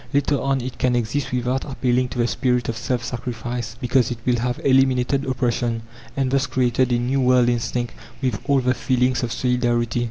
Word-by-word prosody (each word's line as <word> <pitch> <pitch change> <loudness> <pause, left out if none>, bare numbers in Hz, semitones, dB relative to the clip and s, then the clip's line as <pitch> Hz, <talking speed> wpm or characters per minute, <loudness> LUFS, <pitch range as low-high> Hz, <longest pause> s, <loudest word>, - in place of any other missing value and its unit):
Later 140 0 +2
on 135 -1 0
it 130 +1 -6
can 125 -1 +2
exist 120 +4 -1
without 125 +1 -1
appealing 130 -2 0
to 125 - -7
the 120 - +2
spirit 125 0 0
of 115 - -2
self 120 +1 -2
sacrifice, 120 -1 -4
because 125 -2 +2
it 120 - -3
will 125 -1 +2
have 125 +1 -2
eliminated 135 0 +3
oppression, 120 -2 -1 0.3
and 135 -1 +1
thus 135 +1 +2
created 130 0 +1
a 120 - +3
new 130 +3 0
world 125 -1 +4
instinct 120 0 -1 0.3
with 125 -7 -1
all 140 -1 +4
the 125 0 +2
feelings 125 0 +1
of 120 -2 -2
solidarity. 120 -1 0
125 Hz, 190 wpm, -22 LUFS, 120-130 Hz, 0.3 s, world